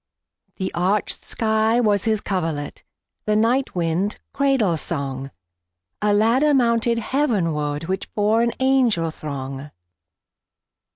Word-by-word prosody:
The 190 -2 -4
arched 190 +4 0
sky 220 +1 +1
was 210 -4 +2
his 220 -2 +1
coverlet, 165 -6 -3 0.4
The 210 - +1
night 235 +4 +1
wind 175 +4 -1 0.2
cradle 270 -11 +2
song;A 90 - -5
ladder 240 +8 +3
mounted 235 -2 +2
heavenwardWhich 185 - -1
bore 215 +2 +2
an 235 0 +2
angel 250 -11 +2
throng. 140 -2 -6
205 Hz, 100 wpm, -22 LUFS, 150-230 Hz, 0.4 s, ladder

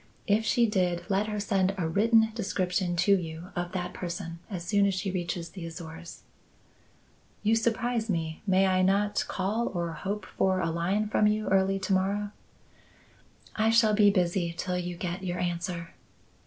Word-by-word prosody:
If 210 +2 +2
she 240 - +4
did, 180 -5 0
let 200 +2 +1
her 210 -1 -3
send 195 -2 +1
a 170 -4 -1
written 220 +5 +3
description 185 -4 -1
to 185 +3 +4
you 165 -1 -5
of 175 0 -3
that 180 -1 -3
person 170 -1 -5
as 180 -4 -5
soon 200 +1 +3
as 195 - 0
she 185 +1 -2
reaches 175 -2 -3
the 180 +1 -9
Azores." 165 +1 -9 1.2
"You 220 +2 +3
surprise 230 0 0
me. 160 -3 -2
May 190 0 +4
I 185 -1 +3
not 200 +2 +2
call 210 +5 -1
or 170 -2 -2
hope 195 +4 -4
for 190 0 0
a 165 -2 0
line 185 +6 0
from 210 0 +3
you 215 0 0
early 195 0 +3
to 190 +1 0
morrow?" 200 +2 0 1.2
"I 220 +1 +2
shall 225 -1 +4
be 205 -1 +6
busy 175 -3 0
till 180 -1 -2
you 175 -1 -4
get 180 +1 -4
your 180 -1 -2
answer." 175 -1 -3
190 Hz, 170 wpm, -28 LUFS, 175-205 Hz, 1.2 s, be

